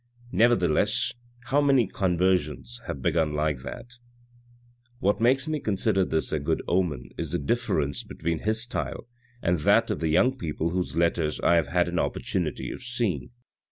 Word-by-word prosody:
" 120 0 -24
Nevertheless 95 -6 +3 0.3
how 135 +3 +1
many 135 -4 +4
conversions 90 +3 0
have - - -5
begun 80 -3 +1
like 75 -2 0
that! 120 - -9 1.0
What 100 0 +1
makes 130 +5 +3
me 155 -1 -1
consider 100 -3 +1
this 80 -3 -1
a 80 - 0
good 70 - -1
omen 80 -9 0
is - - -3
the - - +2
difference 75 - 0
between 80 0 -3
his 110 +1 +1
style 120 -1 -4 0.4
and 85 -1 +2
that - - +3
of - - -2
the 80 - 0
young 125 +12 +3
people 80 0 -2
whose 90 -2 -2
letters 85 -2 +1
I - - +4
have 85 - +1
had 90 0 +1
an 85 0 -1
opportunity - - -2
of - - -8
seeing. 115 - -2
90 Hz, 165 wpm, -26 LUFS, 80-120 Hz, 1.0 s, many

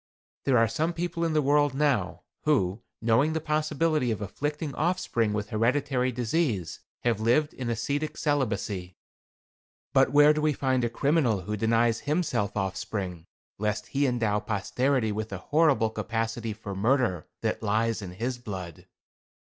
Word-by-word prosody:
There 135 -3 +4
are 115 0 +5
some 160 +9 -1
people 170 0 -2
in 165 -1 +1
the 155 -1 +2
world 145 0 +3
now, 145 -2 0 0.2
who, 115 -9 +2 0.2
knowing 120 +8 +3
the 160 - 0
possibility 155 -2 0
of 110 - -1
afflicting 145 - -3
offspring 150 -10 0
with 105 0 -3
hereditary 125 +3 +1
disease, 120 - -1 0.2
have 115 -3 +1
lived 125 +8 +2
in 125 -2 -4
ascetic 140 +7 -2
celibacy. 105 - -1 1.0
But 135 -1 +4
where 145 +1 +7
do 150 - -1
we 155 0 +2
find 130 -2 0
a 120 - +1
criminal 125 - +1
who 105 +4 -3
denies 115 +1 +2
himself 150 - -1
offspring, 95 -3 -3 0.3
lest 105 0 -2
he 140 0 +1
endow 115 -4 +1
posterity 110 +4 0
with 110 +1 -3
the 95 - -4
horrible 140 - +2
capacity 115 +1 -2
for 105 -1 -7
murder 105 - +1
that - - -1
lies 110 +1 0
in 90 -3 -7
his 120 +6 -3
blood? 95 -8 -7
120 Hz, 150 wpm, -27 LUFS, 105-145 Hz, 1.0 s, where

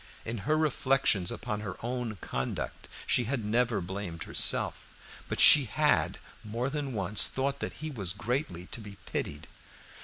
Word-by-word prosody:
In 115 0 -3
her 155 - +4
reflections 135 - +2
upon 105 - -3
her 100 -3 -5
own 120 -2 -2
conduct 65 - -4 0.2
she 125 - +2
had 120 -2 -2
never 115 +1 +2
blamed 90 -2 -5
herself, - - 0 0.4
but - - -2
she 145 -3 +9
had 150 +6 +2 0.3
more 115 +5 -2
than 145 -3 -3
once 100 -1 +3
thought 140 +1 -1
that - - -4
he 155 - -3
was 100 -9 -2
greatly 100 - -2
to 115 - -5
be 105 -2 -9
pitied. - - -4
115 Hz, 155 wpm, -30 LUFS, 100-135 Hz, 0.4 s, she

